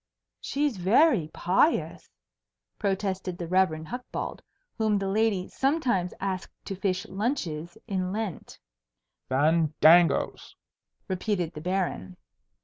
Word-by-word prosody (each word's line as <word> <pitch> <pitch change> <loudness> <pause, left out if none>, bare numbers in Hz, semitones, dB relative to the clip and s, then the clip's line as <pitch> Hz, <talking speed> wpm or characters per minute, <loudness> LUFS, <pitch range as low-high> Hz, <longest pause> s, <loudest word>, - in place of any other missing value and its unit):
"She's 285 -5 -1
very 200 - +4
pious," 180 - +1 0.7
protested 190 -2 -2
the 175 - -4
Rev. 175 -3 +2
Hucbald, 245 +7 -5 0.4
whom 215 -2 +2
the 195 -1 -2
lady 200 -2 +1
sometimes 265 - 0
asked 190 -1 -3
to 195 - -4
fish 190 0 -1
lunches 190 - -3
in 185 -4 -2
Lent. 210 -5 -5 0.7
"Fandangoes!" 160 +3 +3 0.5
repeated 185 -3 -1
the 150 - -8
Baron. 175 - -2
190 Hz, 100 wpm, -27 LUFS, 170-215 Hz, 0.7 s, very